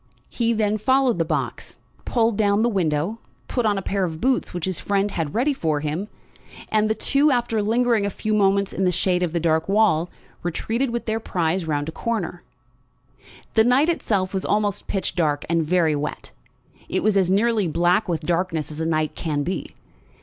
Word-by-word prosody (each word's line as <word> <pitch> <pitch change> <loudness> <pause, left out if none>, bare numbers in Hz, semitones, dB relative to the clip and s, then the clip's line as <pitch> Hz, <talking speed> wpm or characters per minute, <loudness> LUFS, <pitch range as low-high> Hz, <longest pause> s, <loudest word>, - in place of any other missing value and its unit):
He 235 -1 0
then 215 -1 +1
followed 260 -2 +2
the 165 - +2
box, - - -3 0.3
pulled 230 -2 +1
down 205 0 +2
the 240 - +3
window, 175 +1 -1 0.3
put 245 -3 0
on 205 -1 +1
a 195 - -3
pair 195 0 -1
of 160 -3 -3
boots 260 +5 +1
which 175 -2 -3
his 185 -3 -2
friend 200 0 0
had 160 -6 -3
ready 270 +6 +2
for 155 - -1
him; 155 +7 -3 0.6
and 215 0 +2
the 220 - +1
two, 280 +7 +2
after 240 -4 +1
lingering 230 +1 +2
a 200 - 0
few 215 +2 -3
moments 200 -1 +2
in 190 - -1
the 180 - +3
shade 180 +1 +1
of 175 -3 0
the 170 - 0
dark 160 +1 +1
wall, 195 -5 +3 0.3
retreated 225 +9 -1
with 235 0 -3
their 220 0 -1
prize 175 -4 -1
round 145 -1 -1
a - - -3
corner. 185 -3 -3 1.1
The 220 - +5
night 260 +7 +3
itself 200 - 0
was 190 - -1
almost 205 -1 0
pitch 195 - -2
dark, 150 -5 0
and 165 0 +1
very 160 -1 +2
wet. 145 +1 -5 0.6
It - - -1
was 215 -2 +2
as 190 -2 +3
nearly 210 0 +2
black 175 +5 +2
with 165 -2 -1
darkness 165 -1 -1
as 150 - -8
a 160 - -1
night 155 -1 0
can 150 -3 -2
be. 185 +5 -4
195 Hz, 195 wpm, -23 LUFS, 165-220 Hz, 1.1 s, The